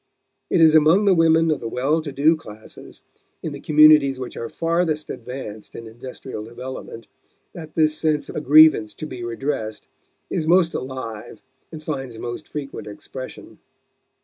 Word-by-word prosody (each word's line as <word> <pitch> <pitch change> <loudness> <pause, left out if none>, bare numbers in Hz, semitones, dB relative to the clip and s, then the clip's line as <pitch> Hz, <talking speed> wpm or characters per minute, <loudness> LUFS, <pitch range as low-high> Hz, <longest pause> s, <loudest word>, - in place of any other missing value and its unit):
It 170 - +2
is 160 -1 +7
among 160 +6 +5
the 195 - +5
women 165 -1 +4
of 150 - -1
the 115 - -5
well 140 +7 0
to 150 -2 -6
do 150 +4 +3
classes, 110 -8 -12 0.4
in 160 - -3
the 140 - -7
communities 150 -3 +5
which 125 - -7
are 115 - -5
farthest 165 -2 -1
advanced 115 -4 -8
in 115 - -8
industrial 120 0 -8
development, 120 0 -8 0.5
that 160 -3 -10
this 155 -1 +3
sense 155 -1 0
of - - -9
a - - -2
grievance 150 -7 +6
to - - -6
be 130 -5 -7
redressed 120 -2 -4 0.4
is 155 - -3
most 170 0 +4
alive 125 -5 -6 0.3
and 155 -2 -9
finds 135 -6 -5
most 120 +6 -6
frequent 140 -6 -7
expression. 130 +5 -10
145 Hz, 160 wpm, -22 LUFS, 120-155 Hz, 0.5 s, is